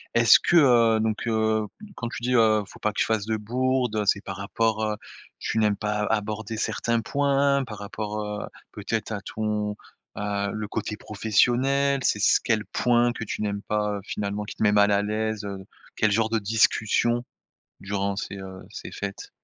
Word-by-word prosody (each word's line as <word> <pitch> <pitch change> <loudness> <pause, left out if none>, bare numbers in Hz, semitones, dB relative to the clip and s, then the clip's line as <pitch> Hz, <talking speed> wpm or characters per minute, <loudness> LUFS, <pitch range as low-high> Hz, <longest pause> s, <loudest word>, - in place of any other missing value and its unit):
est-ce 115 -1 +7
que, 175 - +3
heu, 120 -6 +5
donc 110 0 -1
heu, 110 -1 +1 0.2
m - - -9
quand 120 - -4
tu 120 - -7
dis 125 +1 +1
heu: 110 -2 +4
«Faut - - -14
pas 105 - 0
que - - -4
je - - +3
fasse 110 -2 0
de 110 -1 0
bourdes», 125 +1 0
heu, 105 - +1
c'est 100 - +3
par 95 0 -7
rapport, 110 +2 0
heu 105 -1 0 0.4
tu - - -3
n'aimes 105 -2 +2
pas 105 0 -2
a 115 - +2
aborder 110 +1 -4
certains 115 +1 0
points? 140 +2 +2
Par 105 -2 -8
rapport, 105 +1 -5
heu, 105 0 -4 0.3
peut-être 110 +1 -3
à 100 - -4
ton 105 0 -2 0.4
à 100 -1 -2
le 105 -1 -4
côté 105 0 -4
professionnel? 130 +7 +2
C'est 105 - +2
c - - +4
quel 110 -3 +1
point 120 +3 +2
que 110 - -5
tu 105 - -4
n'aimes 100 -1 -2
pas, 105 -1 -1
heu, 100 - -7
finalement, 105 +1 -3
qui - - -8
te - - -1
met 105 -1 +4
mal 105 0 +5
à 100 0 +3
l'aise, 110 0 -2
heu? 100 -1 -6 0.3
Quel 105 -1 +2
genre 110 +1 +2
de 115 - +1
discussions 110 +3 +2 0.6
durant 100 0 -2
ces, 100 0 -5
heu, 95 -1 -9
ces - - -8
fêtes? 100 0 -6
110 Hz, 200 wpm, -25 LUFS, 105-115 Hz, 0.6 s, est-ce